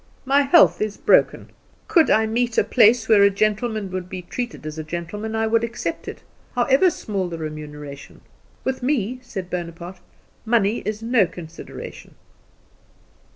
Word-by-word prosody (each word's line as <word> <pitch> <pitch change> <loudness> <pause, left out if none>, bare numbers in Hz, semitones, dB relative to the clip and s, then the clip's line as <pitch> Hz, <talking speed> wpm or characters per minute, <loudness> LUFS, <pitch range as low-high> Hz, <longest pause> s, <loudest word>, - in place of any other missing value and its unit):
My 275 +2 +4
health 290 +4 +5
is 215 -1 -2
broken. - - +2 0.4
Could 355 -7 +4
I 220 +1 +4
meet 235 +1 -1
a - - +5
place 230 -1 +4
where 215 -3 +6
a 200 - +7
gentleman 215 0 -1
would 185 -1 -5
be 185 -1 -6
treated 240 -1 -6
as 155 +1 -6
a - - -4
gentleman 175 +7 -5
I 220 0 +1
would 225 +1 +2
accept 235 0 -4
it, - - -8 0.3
however 270 +9 +4
small 200 - -3
the 165 - -5
remuneration. 150 -2 -8 0.4
With 265 0 -2
me," 250 -2 -1
said 190 -7 -7
Bonaparte, 175 +1 -6 0.4
"money 225 -1 +2
is 215 +1 -3
no 230 -5 +3
consideration." 165 -1 -10
215 Hz, 155 wpm, -22 LUFS, 175-240 Hz, 0.4 s, a